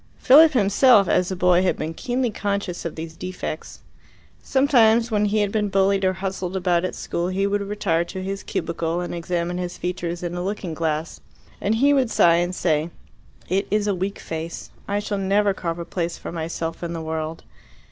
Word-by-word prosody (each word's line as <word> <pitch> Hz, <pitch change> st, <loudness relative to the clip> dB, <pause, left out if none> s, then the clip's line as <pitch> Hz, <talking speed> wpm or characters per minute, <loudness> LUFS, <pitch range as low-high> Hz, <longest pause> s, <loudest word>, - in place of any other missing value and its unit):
Philip 305 Hz, +4 st, +7 dB
himself, 210 Hz, -1 st, +5 dB
as 180 Hz, 0 st, +2 dB
a 190 Hz, -, -2 dB
boy, 180 Hz, 0 st, +4 dB
had 185 Hz, -, +1 dB
been 160 Hz, +1 st, -4 dB
keenly 245 Hz, +5 st, -1 dB
conscious 200 Hz, -4 st, -3 dB
of 170 Hz, -, -4 dB
these 160 Hz, 0 st, -7 dB
defects. 185 Hz, -3 st, -6 dB, 0.6 s
Sometimes 240 Hz, -4 st, +3 dB
when 210 Hz, -1 st, +2 dB
he 210 Hz, +1 st, +1 dB
had 205 Hz, -1 st, 0 dB
been 210 Hz, -1 st, 0 dB
bullied 195 Hz, 0 st, +2 dB
or 185 Hz, 0 st, +3 dB
hustled 190 Hz, -1 st, -4 dB
about 180 Hz, -2 st, +1 dB
at 185 Hz, -, -3 dB
school 170 Hz, +1 st, -3 dB
he 190 Hz, +2 st, 0 dB
would 200 Hz, 0 st, 0 dB
retire 200 Hz, -5 st, 0 dB
to 185 Hz, +2 st, -6 dB
his 195 Hz, +1 st, -4 dB
cubicle 165 Hz, 0 st, -2 dB
and 175 Hz, -, -4 dB
examine 175 Hz, +1 st, -2 dB
his 180 Hz, -1 st, -4 dB
features 175 Hz, -1 st, -4 dB
in 175 Hz, 0 st, -3 dB
a 175 Hz, -, -3 dB
looking 190 Hz, -3 st, -3 dB
glass, 160 Hz, 0 st, -2 dB, 0.4 s
and 210 Hz, +3 st, +1 dB
he 280 Hz, +5 st, +4 dB
would 265 Hz, -4 st, +2 dB
sigh 170 Hz, -6 st, +4 dB
and 175 Hz, +1 st, -1 dB
say, 160 Hz, -2 st, 0 dB, 0.6 s
"It 195 Hz, +3 st, 0 dB
is 210 Hz, 0 st, +1 dB
a 205 Hz, -, +1 dB
weak 190 Hz, +2 st, -3 dB
face. 165 Hz, +1 st, -6 dB, 0.2 s
I 200 Hz, -, 0 dB
shall 205 Hz, -1 st, -2 dB
never 200 Hz, +1 st, +2 dB
carve 170 Hz, -3 st, -4 dB
a 170 Hz, -, -5 dB
place 170 Hz, -1 st, -3 dB
for -, -, -7 dB
myself 165 Hz, 0 st, -4 dB
in 170 Hz, -1 st, -4 dB
the 165 Hz, -, -4 dB
world." 160 Hz, 0 st, -4 dB
185 Hz, 200 wpm, -23 LUFS, 170-205 Hz, 0.6 s, Philip